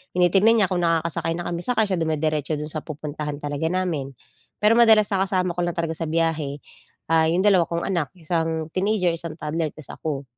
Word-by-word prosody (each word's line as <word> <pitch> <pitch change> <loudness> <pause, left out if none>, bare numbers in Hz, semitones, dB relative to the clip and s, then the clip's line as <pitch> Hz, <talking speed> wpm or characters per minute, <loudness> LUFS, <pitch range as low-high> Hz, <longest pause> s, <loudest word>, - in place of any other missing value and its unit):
tinitignan 195 +6 +4
niya 185 - 0
kung 180 - +1
nakakasakay 165 0 0
na 175 - -4
kami, 170 - -2
saka 230 -3 +2
siya 190 -4 -1
dumiretso 155 -1 0
do'n 150 +1 -5
sa 155 - -3
pupuntahan 150 -1 -5
talaga 145 +2 -2
namin. 165 -7 -2 0.5
Pero 225 +3 +5
madalas 220 -3 +6
na 190 0 +1
kasama 185 -2 0
ko 175 - -6
lang 175 - -3
talaga 165 -2 -2
sa 165 - -2
biyahe 155 -3 -1 0.5
ah, 160 -1 +4
yung 175 +4 +1
2 190 -5 +4
kong 170 0 -2
anak- 170 -7 -1
isang 160 -1 -2
teenager, 190 -2 +1
isang 165 -1 -6
toddler- 160 0 -2
tas 155 -3 -11
ako. 145 -3 -4
165 Hz, 195 wpm, -23 LUFS, 155-185 Hz, 0.5 s, madalas